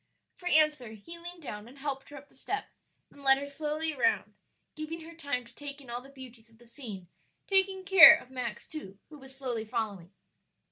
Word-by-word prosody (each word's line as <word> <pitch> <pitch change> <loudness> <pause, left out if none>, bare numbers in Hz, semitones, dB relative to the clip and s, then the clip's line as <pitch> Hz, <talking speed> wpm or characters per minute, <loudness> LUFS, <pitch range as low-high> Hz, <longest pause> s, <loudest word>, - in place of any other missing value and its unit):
For 360 - -8
answer 300 -8 +3
he 335 +11 -10
leaned 345 0 -9
down 210 -4 -7
and 260 +4 -15
helped 270 -1 -5
her 290 - -11
up 285 +1 -13
the - - -26
step, 410 +1 -4 0.4
then 285 - -16
led 270 -1 +6
her 280 - -4
slowly 305 +2 -1
round, 360 +7 +1 0.4
giving 315 +2 -6
her 330 +1 -11
time 285 -7 -3
to 230 - -18
take 285 0 -6
in 260 -4 -12
all 240 +1 -4
the 270 - -15
beauties 250 -4 -13
of 225 - -23
the 240 - -19
scene, 225 -7 -9 0.4
taking 385 -1 +2
care 355 -5 +11
of 260 -5 -10
Max 250 -2 -5
too, 195 -11 -9
who 300 -2 -12
was 265 0 -11
slowly 245 -5 -3
following. 205 -5 -4
280 Hz, 205 wpm, -30 LUFS, 240-315 Hz, 0.4 s, care